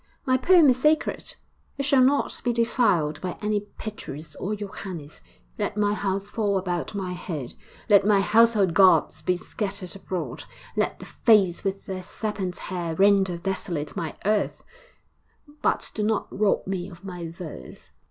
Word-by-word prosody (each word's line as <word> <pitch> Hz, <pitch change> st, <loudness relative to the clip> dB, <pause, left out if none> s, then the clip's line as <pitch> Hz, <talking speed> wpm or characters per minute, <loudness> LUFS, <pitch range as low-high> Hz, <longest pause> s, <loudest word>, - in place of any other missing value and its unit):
My 255 Hz, -2 st, +3 dB
poem 335 Hz, +4 st, +6 dB
is 255 Hz, -1 st, +3 dB
sacred; 305 Hz, +2 st, +1 dB, 0.4 s
it 275 Hz, -, -1 dB
shall 275 Hz, -1 st, +4 dB
not 275 Hz, +3 st, +2 dB
be 245 Hz, -, +2 dB
defiled 190 Hz, -, +1 dB
by 180 Hz, -1 st, -4 dB
any 210 Hz, 0 st, 0 dB, 0.2 s
Petrus 155 Hz, -8 st, -7 dB
or 210 Hz, +3 st, -2 dB
Johannes! 185 Hz, -6 st, -7 dB, 0.4 s
Let -, -, -2 dB
my 205 Hz, 0 st, +2 dB
house 195 Hz, -1 st, -2 dB
fall 205 Hz, -3 st, +1 dB
about 180 Hz, +1 st, -3 dB
my 190 Hz, -2 st, -3 dB
head, 155 Hz, -8 st, -5 dB, 0.3 s
let 205 Hz, -3 st, +6 dB
my 205 Hz, 0 st, +4 dB
household 210 Hz, -3 st, +4 dB
gods 190 Hz, 0 st, +5 dB
be 180 Hz, -1 st, +1 dB
scattered 195 Hz, 0 st, -5 dB
abroad, 185 Hz, -2 st, -5 dB, 0.3 s
let -, -, 0 dB
the -, -, -10 dB
Fates 200 Hz, -7 st, +3 dB
with 195 Hz, 0 st, -3 dB
their 190 Hz, -1 st, -4 dB
serpent 190 Hz, -1 st, -4 dB
hair 175 Hz, -3 st, -4 dB
render 195 Hz, -1 st, +4 dB
desolate 170 Hz, -5 st, -3 dB
my 160 Hz, -3 st, -4 dB
hearth; 210 Hz, +1 st, 0 dB, 1.0 s
but -, -, 0 dB
do 215 Hz, -, -3 dB
not 215 Hz, +1 st, +1 dB
rob 205 Hz, 0 st, +1 dB
me 185 Hz, -1 st, -3 dB
of 180 Hz, +1 st, -14 dB
my 175 Hz, -3 st, -6 dB
verse. 160 Hz, -, -10 dB
195 Hz, 155 wpm, -25 LUFS, 180-215 Hz, 1.0 s, poem